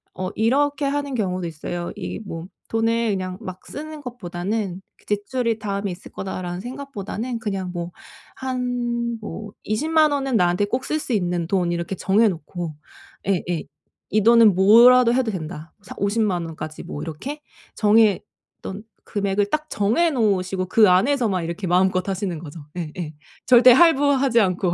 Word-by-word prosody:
어 185 0 -3
이렇게 280 +5 +1
하는 285 0 -1
경우도 185 -5 -1
있어요. 175 +2 -5
이 - - -5
뭐 165 -2 -6 0.2
돈을 230 0 +1
그냥 185 -2 -3
막 185 -3 -8
쓰는 310 +1 -7
것보다는 195 -5 -4 0.2
'그 - - -27
지출이 225 +2 -1
다음에 200 -1 -3
있을 175 +2 -10
거다.'라는 180 -2 -5
생각보다는 245 -2 -5
그냥 195 -5 -3
뭐 175 0 -4 0.4
한 245 -2 -2
뭐 215 -1 -7
'200,000 310 +7 +2
원은 270 -4 0
나한테 180 +1 +2
꼭 250 +5 -2
쓸 310 - -1
수 255 - -3
있는 175 -4 0
돈.' 180 -2 +1
이렇게 170 +2 -3
정해 210 +5 +3
놓고 170 -1 -5 0.5
예예. 175 -4 0 0.5
'이 215 -1 +2
돈은 230 -3 +6
뭐라도 235 +5 +7
해도 255 -2 +1
된다.' 160 -3 -7
사 - - -9
오십만 200 -4 0
원까지 155 -1 -7
뭐 145 - -6
이렇게 265 - -6 0.3
정했던 210 -1 +1 0.2
금액을 200 -1 0
딱 305 0 -1
정해 230 +12 +2
놓으시고 190 -7 0
그 215 +3 +5
안에서만 200 -1 +2
이렇게 170 +4 -4
마음껏 185 +1 +2
하시는 190 -3 -2
거죠. 160 0 -9 0.2
예예. 160 -1 -5 0.3
절대 250 0 +8
할부하지 280 -5 +4
않고. 180 -2 +1
205 Hz, 310 characters per minute, -22 LUFS, 180-245 Hz, 0.5 s, 절대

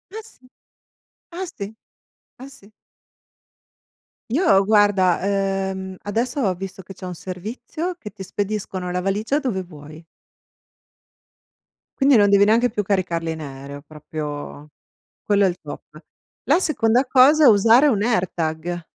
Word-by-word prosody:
Ah 445 - -5
s - - -24 1.0
ah 380 - -3
sì, 200 -1 -5 0.7
ah 270 - -9
sì. 220 -6 -18 1.6
Io 235 - +3
guarda, 205 -4 +3
ehm, 195 -1 -2
adesso 240 +7 -2
ho 190 -5 +1
visto 190 +1 -8
che 195 +2 -11
c'è 185 - -10
un 180 -1 -6
servizio, 235 - -6
che 210 - -9
ti 195 -1 -10
spediscono 195 -2 -4
la 180 - -1
valigia 210 +9 -1
dove 225 -10 -2
vuoi. 155 -1 -13 1.9
Quindi 275 -1 +5
non 205 -2 +5
devi 200 0 +5
neanche 235 +3 +3
più 210 -1 -2
caricarli 175 -4 -1
in 160 -1 -6
aereo, 140 0 -9
proprio 150 -1 -8 0.5
quello 200 -1 +3
è - - +4
il 175 - -5
top. - - -11 0.4
La - - +3
seconda 250 -7 +2
cosa, 280 +4 +6
è - - +9
usare 230 +7 +5
un 210 -7 +1
AirTag. 175 -6 -2
195 Hz, 135 wpm, -21 LUFS, 180-230 Hz, 1.9 s, è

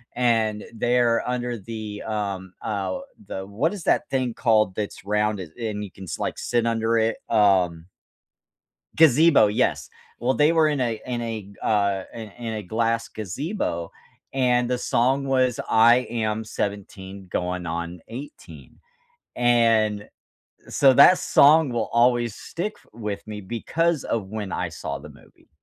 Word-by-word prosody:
and 110 -4 +1
they're 120 +1 +1
under 125 -1 -2
the, 110 0 -7
um, 100 -4 -4
uh, 105 - -2 0.3
the 95 0 -5
what 120 - -1
is 195 - -7
that 150 - +1
thing 130 -3 -1
called 110 -6 +2
that's 105 -2 -5
rounded 105 -4 -1
and 110 -3 -4
you 100 - -8
can 95 - -11
like - - -3
sit 120 -1 0
under 115 0 +1
it? 110 0 +1
Um 95 -6 +3 1.1
Gazebo, 155 -6 +6
yes. 105 - 0 0.3
Well, 125 +2 0
they 150 +2 +4
were 160 -2 +4
in 145 -3 -1
a 115 -3 -1
in 120 -2 -3
a, 110 -4 -5
uh, 100 -3 +1
in 110 -2 -8
in 115 -2 -6
a 105 - -4
glass 115 +3 -1
gazebo, 105 - -4 0.4
and 125 -2 +2
the 125 - 0
song 130 +3 +1
was 130 -2 +1
"I 115 +2 +6
am 110 -1 -2
17 100 -2 -5
going 90 0 -2
on 85 +1 -4
18," 130 +6 -11 0.6
and 115 -4 +2 0.6
so 135 -2 +5
that 160 +7 +8
song 150 0 +5
will 115 -2 -2
always 120 -1 +3
stick 205 +5 -5 0.2
with 105 -3 -5
me 105 -1 -6
because 155 - -1
of 110 -4 -2
when 105 -1 -5
I - - -2
saw - - -6
the - - -11
movie. - - -20
115 Hz, 150 wpm, -24 LUFS, 105-125 Hz, 1.1 s, that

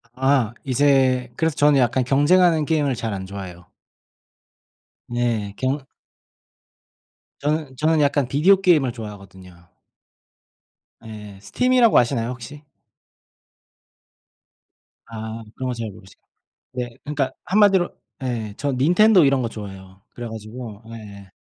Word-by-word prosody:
아. 130 -3 +1
이제 130 -2 +2
그래서 160 -2 0
저는 145 -1 +4
약간 125 +1 +2
경쟁하는 155 +4 +3
게임을 145 -4 0
잘 115 +1 -4
안 95 -1 -5
좋아해요. 95 -3 -9 1.4
네. 115 -4 -2
경 135 +1 -2 1.5
저는 150 -2 -2
저는 155 +1 +2
약간 140 -2 +1
비디오 185 +9 +4
게임을 155 -9 +3
좋아하거든요. 95 -6 -12 1.4
예예. 105 -3 -10
스팀이라고 250 - +3
아시나요, 120 -1 +1
혹시? 130 +4 -9 2.4
아. 110 0 -7
그런 130 -1 -4
거 - - -1
잘 115 -2 -5
모르시구나. 95 -1 -18 0.5
네. 125 -1 -4
그러니까 145 -3 -2
한마디로 195 -3 +4 0.3
예. 115 -5 -3
저 145 0 -1
닌텐도 175 +8 +4
이런 135 -1 +2
거 115 - -2
좋아해요. 95 -3 -10
그래 120 -1 -7
가지고 110 0 -9
예예. 100 -4 -11
125 Hz, 265 characters per minute, -22 LUFS, 110-145 Hz, 2.4 s, 저는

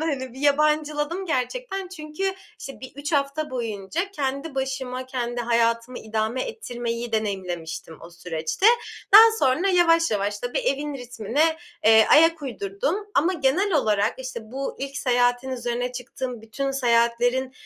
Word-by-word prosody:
hani 275 -6 -2
bir 260 - -11
yabancıladım 300 +4 +1
gerçekten. 385 - -2
Çünkü 355 +2 -4 0.3
işte 270 - -9
bir 260 - -9
3 290 +3 -5
hafta 285 +2 0
boyunca 230 - -3
kendi 275 -3 -3
başıma, 260 -1 -3
kendi 240 -2 -3
hayatımı 230 +1 +1
idame 220 +3 -2
ettirmeyi 240 - -5
deneyimlemiştim 175 -6 -3
o 170 - -11
süreçte. 170 - -2 0.5
Daha 425 - +13 0.2
sonra 280 +7 +2
yavaş 335 -3 +4
yavaş, 205 -1 -1
tabii, 245 +3 -3
evin 295 - -1
ritmine, 250 +5 0 0.3
eee, 220 0 +7
ayak 325 0 +5
uydurdum. 240 - -2 0.2
Ama 330 +6 +3
genel 350 +5 +1
olarak 215 -8 +2
işte 255 -2 -6
bu 270 +1 -4
ilk 275 +1 -5
seyahatin 245 -1 +1
üzerine 245 0 -2
çıktığım 250 -1 -6
bütün 270 +5 -3
seyahatlerin 245 0 +1
260 Hz, 135 wpm, -24 LUFS, 235-300 Hz, 0.5 s, Daha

